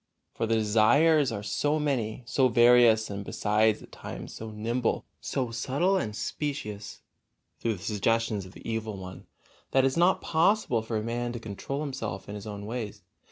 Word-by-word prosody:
For 115 - -2
the 115 - +2
desires 125 +7 +4
are 100 -2 -4
so 145 +8 0
many, 130 -6 -1
so 130 +2 +3
various, 120 -2 +5
and 100 0 -4
besides 105 +2 +1
at - - -15
times - - -8
so 110 - -7
nimble, 115 +3 -1
so 125 -4 -2
subtile 140 +11 +1
and 105 - -1
specious, 105 -4 -4 0.6
through 115 -2 0
the 95 - -11
suggestions 110 -1 0
of 95 - -14
the - - -11
evil 110 -2 -3
one, 95 -1 -9 0.4
that 135 - +3
it - - +4
is 135 - -2
not 175 +2 +4
possible 165 - +2
for 110 0 -3
a 105 - -2
man 120 +1 -2
to 120 - -5
control 115 +6 -5
himself 115 -10 -4
in 100 - -6
his 105 0 -7
own 100 -1 -6
ways. 105 -3 -5
115 Hz, 180 wpm, -28 LUFS, 105-130 Hz, 0.6 s, various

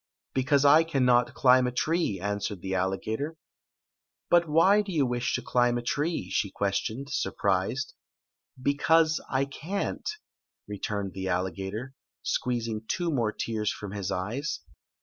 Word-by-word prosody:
"Because 135 +2 +2
I 150 +3 +7
cannot 125 -6 +2
climb 125 -1 +5
a - - -1
tree," 155 - 0
answered 100 -1 -3
the 95 0 -3
alligator. 110 - -2 0.4
" - - -65
But 170 -2 +5
why 190 +7 +5
do 200 -2 -6
you 150 -6 +2
wish 125 0 -1
to - - -3
climb 120 -1 +2
a 120 - -4
tree?" 145 - -1
she 100 - +1
ques 100 +1 0
tioned, 135 +6 -5
surprised. 100 +3 0 0.4
" - - -29
Because 160 +2 +3
I 135 +1 +1
can't," 170 - -4 0.6
returned 100 -1 -3
the 95 0 -4
alligator, 95 +7 -3 0.3
squeezing 115 -3 -1
two 175 -2 -1
more 120 -7 +1
tears 110 -1 -2
from 105 -2 -7
liii 100 -2 -3
eyes. 115 +11 -3
125 Hz, 150 wpm, -28 LUFS, 100-145 Hz, 0.6 s, I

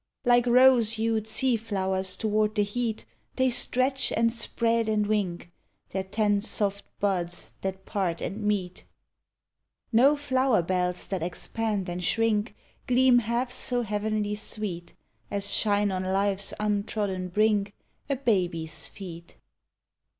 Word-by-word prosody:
Like 245 0 +4
rose 245 -2 +5
hued 220 -1 -1
sea 240 +3 +2
flowers 190 -3 0
toward 215 0 0
the 210 - +3
heat 220 - -3 0.3
They 260 0 +2
stretch 255 +2 +1
and 230 0 +2
spread 230 -1 0
and 210 -1 +1
wink 185 -5 -2 0.4
Their 190 0 -2
ten 205 +1 +1
soft 200 -2 -1
buds 180 -4 -1
that 190 0 -4
part 185 -5 -2
and 210 +3 -4
meet. 200 -4 -2 1.1
No 260 +6 +5
Hower 260 -7 +1
lK'lls 180 0 -1
that 190 -3 -2
expand 200 +3 -2
and 175 +1 -4
shrink 225 +3 +1 0.3
Gleam 250 0 +5
half 240 +2 -1
so 250 -1 0
heavenly 210 0 -1
sweet 210 -4 -3 0.3
As 200 0 -1
shine 205 -1 +2
on 185 -1 -2
life's 195 +1 0
untrodden 205 -3 -1
brink 205 +1 +1 0.3
A 275 - +1
baby's 180 - -1
feet. 170 -4 -10
210 Hz, 130 wpm, -27 LUFS, 190-230 Hz, 1.1 s, rose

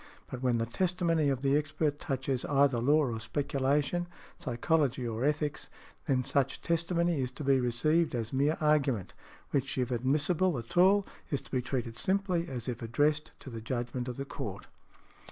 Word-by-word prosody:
But 125 - -5
when 125 -2 +2
the 115 - 0
testimony 165 +2 +1
of 135 -2 -1
the 140 0 +3
expert 150 0 0
touches 135 -3 -2
either 140 -3 +3
law 145 +5 +4
or 115 - -3
speculation, 140 +7 0 0.3
psychology 130 0 0
or 115 +1 -3
ethics, 150 0 -1 0.4
then 130 -2 +2
such 135 +1 0
testimony 170 -2 +1
is 125 - -1
to 130 +4 -8
be 135 -1 +4
received 140 +6 +1
as 115 0 -3
mere 145 +4 +2
argument, 145 - +1 0.4
which 135 -1 -1
if 125 -1 0
admissible 150 +7 +1
at 115 -1 -7
all 190 +3 +5 0.2
is 140 -5 0
to - - -18
be 130 - +1
treated 120 -2 -3
simply 185 -3 0
as 125 -3 -5
if 120 -2 -3
addressed 145 +7 +1
to 135 - -9
the 115 -1 -6
judgment 120 +2 -3
of 125 - -5
the 135 - -4
Court. - - -6
140 Hz, 170 wpm, -30 LUFS, 125-155 Hz, 0.4 s, all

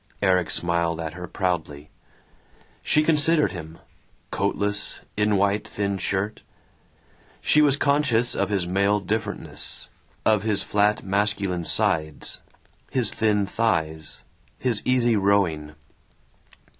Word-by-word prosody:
Erik 90 -3 +2
smiled 85 -1 0
at 80 -1 -4
her 90 +1 -7
proudly. 80 -7 -3 0.9
She 155 - +2
considered 155 0 +3
him 80 -3 -9 0.5
coatless, 105 0 -1
in 105 0 +2
white 100 +1 +1
thin 100 -1 -2
shirt. 100 +3 -2 1.0
She 150 - +4
was 145 -2 +4
conscious 140 -5 +3
of - - -1
his 95 -4 -1
male 100 +3 +2
differentness, 105 +1 -5 0.4
of 110 -2 +3
his 105 -2 +1
flat 105 +1 +1
masculine 100 -3 0
sides, 75 -1 0 0.5
his 125 -6 +2
thin 105 -2 +1
thighs, 80 -8 -2 0.3
his 115 -2 -1
easy 120 -2 +3
rowing. 90 -7 +1
100 Hz, 110 wpm, -24 LUFS, 90-110 Hz, 1.0 s, She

